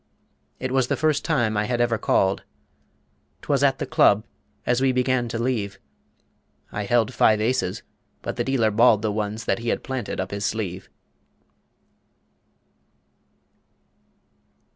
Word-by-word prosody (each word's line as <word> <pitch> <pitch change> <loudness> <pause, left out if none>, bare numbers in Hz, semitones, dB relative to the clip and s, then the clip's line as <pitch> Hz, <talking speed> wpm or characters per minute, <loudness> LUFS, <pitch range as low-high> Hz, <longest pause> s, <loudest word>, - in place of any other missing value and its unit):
It 130 0 -3
was 130 -2 +2
the - - 0
first 155 -1 +1
time 120 -10 +1
I 105 +1 +1
had 120 +1 -1
ever 120 -2 +1
"called." 95 0 +2 1.0
'Twas - - +1
at - - +3
the - - -3
club, 105 +2 +3 0.4
as 120 +1 +1
we 135 -1 +3
began 125 -1 +1
to 115 - -4
leave. 115 -5 -2 0.9
I 105 0 -3
held 115 0 +2
five 110 -1 +4
aces, 125 +4 -1 0.4
but - - -4
the - - -1
dealer 120 -5 +1
balled 110 0 +4
The 110 - 0
ones 105 +1 -3
that - - 0
he 115 0 -3
had - - -1
planted 130 -8 -4
up 95 0 -3
his 100 0 -4
sleeve. 95 -3 -3
115 Hz, 140 wpm, -24 LUFS, 105-125 Hz, 1.0 s, five